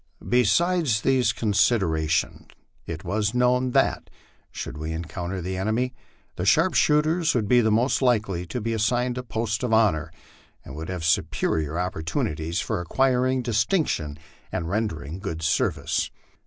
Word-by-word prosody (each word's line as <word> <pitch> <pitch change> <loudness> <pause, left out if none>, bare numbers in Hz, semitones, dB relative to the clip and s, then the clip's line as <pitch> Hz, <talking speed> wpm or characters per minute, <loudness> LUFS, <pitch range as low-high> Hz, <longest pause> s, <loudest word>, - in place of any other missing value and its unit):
Besides 125 - +2
these 130 0 +2
considerations, 90 - +1 0.4
it 80 -1 -6
was 105 +4 -1
known 125 +1 +2
that, - - +1 0.4
should - - -6
we 80 +2 -4
encounter 85 +3 -4
the 95 +2 -4
enemy, 110 +6 -1 0.4
the 90 - -2
sharp 160 - +3
shooters 155 +2 +2
would 110 -4 0
be 125 +2 +5
most 115 +5 +2
likely 105 -8 +1
to 125 - -4
be 115 +1 -2
assigned 120 +3 0
a - - -2
post 110 -2 -2
of 125 -2 -1
honor, 90 -8 +2 0.5
and 65 - -9
would 80 +3 -6
have 90 -3 -4
superior 80 0 0
opportunities 80 -2 -2
for - - -2
acquiring 130 +5 +1
distinction 110 - 0 0.3
and 85 - -3
rendering 85 -7 -3
good 80 -5 -5
service. 80 - 0
105 Hz, 140 wpm, -25 LUFS, 85-125 Hz, 0.5 s, be